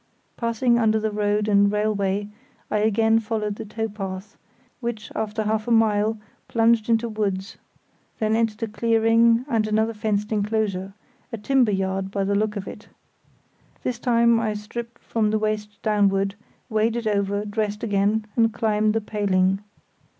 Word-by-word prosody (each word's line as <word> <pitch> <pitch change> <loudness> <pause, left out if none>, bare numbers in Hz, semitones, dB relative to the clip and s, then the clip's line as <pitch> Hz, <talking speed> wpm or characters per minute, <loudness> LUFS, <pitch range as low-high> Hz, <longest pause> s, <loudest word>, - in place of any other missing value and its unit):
Passing 235 +1 +1
under 220 -1 +3
the 215 0 -1
road 210 0 0
and 200 -1 +4
railway, 205 -1 0 0.4
I 210 - +2
again 220 +1 +3
followed 210 -2 -3
the - - -6
tow 225 +2 -3
path, 195 -1 -7 0.4
which, 235 -4 -5
after 220 0 -2
half 215 +1 -1
a - - -1
mile, 220 -1 +3 0.3
plunged 230 -1 +2
into 230 +1 +2
woods, 200 -3 -3 0.6
then 215 -1 +1
entered 225 -1 0
a - - 0
clearing 230 +2 +3
and 225 -5 +1
another 220 +1 +1
fenced 210 -1 -1
enclosure; 205 -3 -1 0.4
a 230 - -4
timber 245 +1 +2
yard 190 0 -1
by 195 0 -1
the 200 +1 0
look 210 +1 0
of 200 -1 -5
it. 210 - -9 1.0
This 245 -2 -2
time 235 -1 +3
I 215 -2 -1
stripped 235 +3 -7
from 220 -2 0
the 215 - +1
waist 210 -1 -3
downward, 200 -2 +2 0.3
waded 225 +2 0
over, 205 -1 0
dressed 210 0 -2
again, 210 0 +1
and 225 -1 +3
climbed 215 -1 +1
the 225 - +1
paling. 195 -3 +1
215 Hz, 155 wpm, -23 LUFS, 205-225 Hz, 1.0 s, and